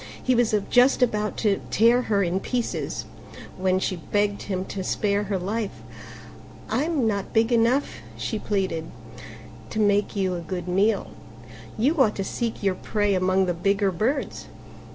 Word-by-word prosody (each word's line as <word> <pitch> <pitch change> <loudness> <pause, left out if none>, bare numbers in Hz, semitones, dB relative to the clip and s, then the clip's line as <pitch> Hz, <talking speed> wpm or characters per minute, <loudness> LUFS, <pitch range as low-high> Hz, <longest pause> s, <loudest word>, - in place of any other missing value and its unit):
He 255 - +2
was 235 -3 +2 0.2
just 250 +1 +5
about 210 -3 0
to 200 -2 +2
tear 235 +3 +4
her 200 -2 +3
in 180 +1 0
pieces 245 +3 -3 0.5
when 185 0 +1
she 185 -1 -1
begged 205 +5 -1
him 190 -2 -3
to 190 -1 -5
spare 205 +2 0
her 200 -1 -1
life: 205 +3 -4 0.9
"I'm 300 -3 +1
not 200 -3 -1
big 225 +1 +3
enough," 235 +5 +2 0.2
she 220 - -3
pleaded, 190 -7 -1 0.8
"to - - -3
make 205 0 +2
you 190 -2 0
a 175 - -3
good 175 +1 -5
meal: 195 +5 +1 0.7
you 275 +7 +2
ought 215 -5 +3
to 195 - -2
seek 225 +2 -3
your 195 -2 +2
prey 205 +2 0
among 185 0 +2
the 180 - 0
bigger 195 +3 +1
birds." 235 - -2
205 Hz, 155 wpm, -25 LUFS, 190-230 Hz, 0.9 s, just